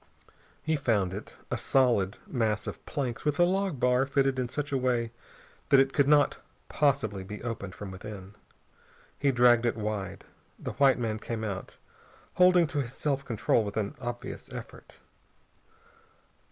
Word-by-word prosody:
He 160 0 +1
found 110 -10 +1
it, 100 - -8
a - - -1
solid 120 -8 +2
mass 115 - -1
of - - -7
planks 125 -5 -3
with 150 +1 0
a - - +7
log 190 -4 +1
bar 125 +2 +3
fitted 135 -1 +1
in 125 -1 -1
such 145 +2 -4
a 135 - +2
way 120 -3 0 0.6
that 140 - +7
it 135 0 +3
could 140 0 +3
not 145 0 +4 0.3
possibly 130 -10 +1
be 105 +3 -8
opened 105 -6 -5
from 100 -2 -7
within. 95 0 -9 0.9
He 140 -1 +3
dragged 120 -2 +5
it 120 -1 0
wide. 105 -3 -4 0.3
The - - -5
white 135 -2 +6
man 110 -3 -2
came 110 0 -4
out, 100 -3 -5 0.6
holding 180 -1 +5
to 145 -2 -1
his 120 -1 -6
self 140 -1 -1
control 115 -2 +1
with 100 0 -5
an 105 -2 -1
obvious 120 -1 -6
effort. - - -10
120 Hz, 160 wpm, -29 LUFS, 105-140 Hz, 0.9 s, a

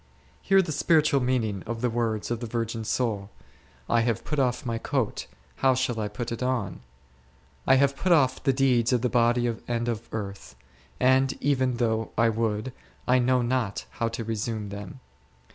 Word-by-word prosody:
Hear 195 -1 +4
the 165 - -4
spiritual 155 -2 +3
meaning 120 -6 0
of 115 0 -4
the 125 - +1
words 115 -2 -1
of 120 - -1
the 120 - -5
vir 115 +1 -1
gin 115 0 -5
soul; 110 -3 -1 0.3
/ - - -30
have 115 -2 +1
put 150 - -2
off 125 -1 0
my 115 -1 -2
coat, 130 - -2 0.3
how 130 -1 +3
shall 125 -3 -1
I 105 - -1
put 115 +3 -5
it 115 - -4
on? 125 -8 -1 0.9
I - - +7
have 140 +1 +3
put 185 +5 -1
off 145 -6 +4
the 135 - +3
deeds 130 -3 +2
of 125 -1 +1
the 125 - +2
body 120 0 +2 0.2
and 120 0 -1
of 115 -2 -3
earth, 100 -9 -6 0.4
and 130 +1 +4
even 130 -3 +1
though 115 -2 0
I 115 +1 +4
would, 110 +2 -1 0.3
I 125 +1 +4
know 125 0 +2
not 120 -4 -1
how 115 - -2
to 115 0 -4
resume 110 -1 -3
them. 100 +6 -8
120 Hz, 185 wpm, -26 LUFS, 110-130 Hz, 0.9 s, I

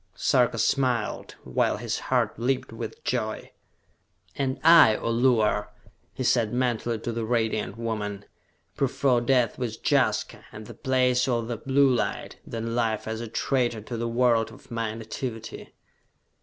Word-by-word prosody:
Sarka 125 -3 +2
smiled, 125 -1 0
while 65 - 0
his - - -3
heart - - +1
leaped 130 +2 -1
with - - -7
joy. - - -3 0.8
"And 135 -1 -2
I, 165 -10 +8
O 115 - -2
Luar," 115 -4 +2 0.4
he 130 - -5
said 120 -3 +2
mentally 120 -2 0
to 115 +2 -4
the 115 0 -3
Radiant 110 -2 -1
Woman, 105 -3 -4 0.5
"prefer 135 -2 +1
death 125 0 +1
with 115 -3 -3
Jaska, - - +1
at 105 +1 -9
the - - -10
Place 125 -1 +1
of 120 -3 0
the 120 - -2
Blue 135 +3 +3
Light, 120 - -2
than 115 0 -4
life 115 -3 -1
as 110 +1 -3
a 115 - -5
traitor 120 -1 0
to 115 +3 -6
the 115 0 -2
world 115 -2 +2
of 125 - -16
my 115 -2 -2
nativity!" 115 0 -6
115 Hz, 150 wpm, -26 LUFS, 110-125 Hz, 0.8 s, I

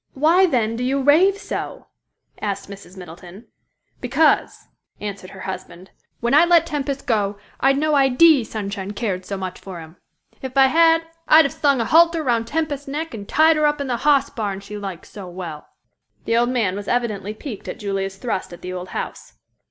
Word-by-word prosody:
"Why, 335 +7 +4
then, 230 -7 0
do 245 - -3
you 270 +2 0
rave 330 +9 +4
so?" - - -6 0.6
asked 200 -1 -3
Mrs. 195 -1 -12
Middleton. 180 +4 -11 0.5
"Because," 280 +5 +1 0.3
answered 200 -3 -6
her 190 - -11
husband, 185 -1 -8 0.3
"when 235 +2 0
I 300 +3 +7
let 340 -1 +4
Tempest 280 -2 -3
go, 205 -3 0 0.2
I'd 270 +1 +3
no 305 +1 +1
idee 275 +1 +5
Sunshine 200 -2 -5
cared 195 -4 -3
so 200 - -4
much 185 -1 -6
for 185 -3 -9
him. 160 +1 -12 0.4
If 265 0 -6
I 270 - +7
had, 330 +2 +4 0.2
I'd 315 0 +7
have 280 - -2
slung 285 -4 +2
a 230 - 0
halter 335 +3 +4
round 230 -4 0
Tempest's 290 -1 -3
neck 300 +2 -4
and 205 -3 -8
tied 315 0 +4
her 305 -1 +3
up 295 0 0
in 280 - -2
the 250 -3 -1
hoss 285 +1 +2
barn 205 -7 -3
she 200 +1 -10
likes 195 -4 -7
so 200 -3 -10
well!" 175 -4 -8 0.6
The 230 - +1
old 240 +1 +2
man 225 -7 0
was 205 0 -6
evidently 215 -4 -2
piqued 220 -2 -8
at - - -5
Julia's 195 -1 -3
thrust 195 -4 -3
at 175 0 -12
the 180 0 -5
old 180 0 -6
house. - - -6
235 Hz, 190 wpm, -21 LUFS, 195-290 Hz, 0.6 s, I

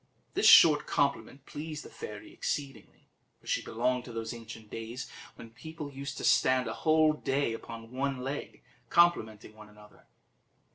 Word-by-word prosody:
This - - +3
short 150 -3 +8
compliment 140 -1 -1
pleased 155 0 -7
the - - -10
fairy 330 -8 -9
exceedingly, 140 - -5 0.3
for - - -26
she - - 0
belonged 125 +2 -1
to 120 - -9
those 115 0 -4
ancient 115 -2 -11
days 115 +3 -6 0.3
when 115 - -12
people 150 +3 -9
used 140 0 -6
to - - -6
stand 130 -1 +3
a 110 - -3
whole 155 +3 +3
day 140 -4 -1
upon 115 0 -9
one 135 0 -2
leg 135 +3 -6 0.3
complimenting 110 -12 +2
one 105 -1 -14
another. 105 0 -19
130 Hz, 155 wpm, -30 LUFS, 115-145 Hz, 0.3 s, short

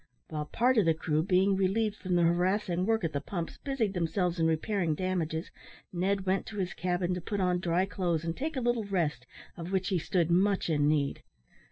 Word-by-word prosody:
While 150 -2 -3
part 240 +9 +2
of 205 - +3
the 165 -1 +3
crew, 155 -1 0
being 190 +2 +3
relieved 200 +3 +1
from 185 -3 -2
the 175 - +4
harassing 180 +2 +1
work 225 -3 +2
at 165 - -1
the 140 - -1
pumps, 170 +1 -5
busied 250 -8 -1
themselves 175 0 0
in 165 - +3
repairing 165 0 0
damages, 170 -2 -2 0.4
Ned 190 +2 0
went 190 +1 0
to 215 - -7
his 185 -2 -2
cabin 180 +1 -1
to 180 - -3
put 205 +3 -3
on 180 -1 +2
dry 175 +1 +1
clothes 175 -5 -1
and 165 0 -2
take 310 +3 -3
a 260 - -1
little 240 -2 0
rest, 175 -6 -1 0.3
of 170 +1 -7
which 190 -1 0
he 185 - +1
stood 170 +1 0
much 190 0 +2
in 145 -2 +2
need. 145 -2 +1
180 Hz, 210 wpm, -30 LUFS, 165-200 Hz, 0.4 s, the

